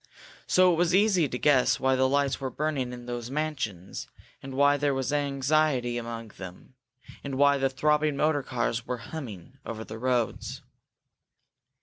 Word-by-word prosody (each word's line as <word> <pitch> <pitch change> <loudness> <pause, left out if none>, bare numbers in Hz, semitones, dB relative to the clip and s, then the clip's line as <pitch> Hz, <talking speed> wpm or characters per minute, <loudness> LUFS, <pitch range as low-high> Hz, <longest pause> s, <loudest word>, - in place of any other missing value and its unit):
So 185 -1 +5
it - - -1
was 175 +1 +3
easy 190 -7 +3
to 125 - -3
guess 135 -2 +3
why 130 0 +2
the 130 0 +2
lights 140 0 +1
were 135 - -2
burning 140 -4 -2
in 120 -1 -8
those 120 -1 -5
mansions, 130 - -4 0.3
and 135 -1 -8
why 145 +1 +5
there 145 -1 0
was 135 +1 -1
anxiety 140 -3 +1
among 115 -1 -6
them, 95 +6 -10 0.5
and 140 -1 -4
why 140 0 +4
the 135 0 +2
throbbing 150 +2 +1
motor 150 -1 +2
cars 120 -2 -2
were 125 - -2
humming 125 - -9
over 110 -1 -6
the 110 0 -8
roads. 125 -2 -1
135 Hz, 160 wpm, -27 LUFS, 120-150 Hz, 0.5 s, So